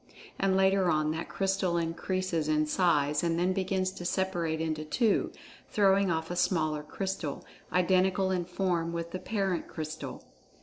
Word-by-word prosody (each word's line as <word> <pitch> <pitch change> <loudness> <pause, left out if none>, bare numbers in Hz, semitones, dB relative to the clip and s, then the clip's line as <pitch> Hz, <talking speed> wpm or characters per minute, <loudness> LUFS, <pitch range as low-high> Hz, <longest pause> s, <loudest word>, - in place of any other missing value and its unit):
And, 190 -1 +2
later 190 -1 +3
on, 155 -1 +2
that 160 +1 -4
crystal 190 -2 0
increases 170 0 -1
in 155 0 +2
size, 150 -3 +2
and 165 -1 +1
then 180 +2 +2
begins 190 -1 0
to 175 - -8
separate 175 -3 -1
into 155 -1 -2
two, 210 +8 +1 0.4
throwing 195 -1 +3
off 160 0 -1
a - - -2
smaller 155 -4 +1
crystal, 155 -1 -4 0.3
identical 185 +1 +2
in 180 -2 0
form 175 -2 -1
with 170 0 -4
the 185 - -4
parent 195 -4 -1
crystal. 155 -4 -6
175 Hz, 155 wpm, -30 LUFS, 160-190 Hz, 0.4 s, later